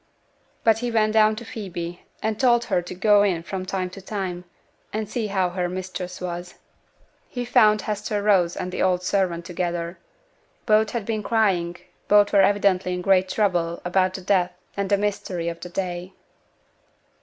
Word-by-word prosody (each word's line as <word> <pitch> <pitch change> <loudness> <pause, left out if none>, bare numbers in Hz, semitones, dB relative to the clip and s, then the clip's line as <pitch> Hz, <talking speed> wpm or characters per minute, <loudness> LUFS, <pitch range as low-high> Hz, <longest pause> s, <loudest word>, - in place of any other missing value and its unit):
But 225 -1 +4
he 245 +1 -2
went 215 -2 +2
down 215 0 +5
to 235 +2 -8
Phoebe, 175 -6 -6 0.2
and 220 0 -1
told 240 -2 +4
her 190 -6 +1
to 175 +1 -8
go 205 +2 +5
in 185 -5 +1
from 185 +1 -5
time 185 -1 -2
to 195 - -10
time, 185 -3 -4 0.5
and 215 0 -3
see 220 +1 -2
how 190 -3 0
her 180 -1 -1
mistress 185 0 -5
was. 175 0 -5 0.7
He 245 -1 -4
found 215 -4 +4
Hester 210 0 -2
Rose 185 -5 +3
and 180 0 -4
the - - -3
old 180 -1 +2
servant 180 -3 0
together; 175 -1 -3 0.7
both 215 -1 +4
had 230 -3 -3
been 220 -1 -2
crying, 190 -6 +1 0.3
both 205 0 +5
were 200 - +6
evidently 190 -2 +2
in 180 - -5
great 190 -1 +3
trouble 175 -5 0
about 185 +1 +1
the 190 - -6
death 180 -1 +1 0.2
and 200 -1 -2
the 200 - +4
mystery 190 -4 -2
of 170 0 -7
the 180 - -8
day. 180 0 -4
190 Hz, 175 wpm, -24 LUFS, 180-210 Hz, 0.7 s, were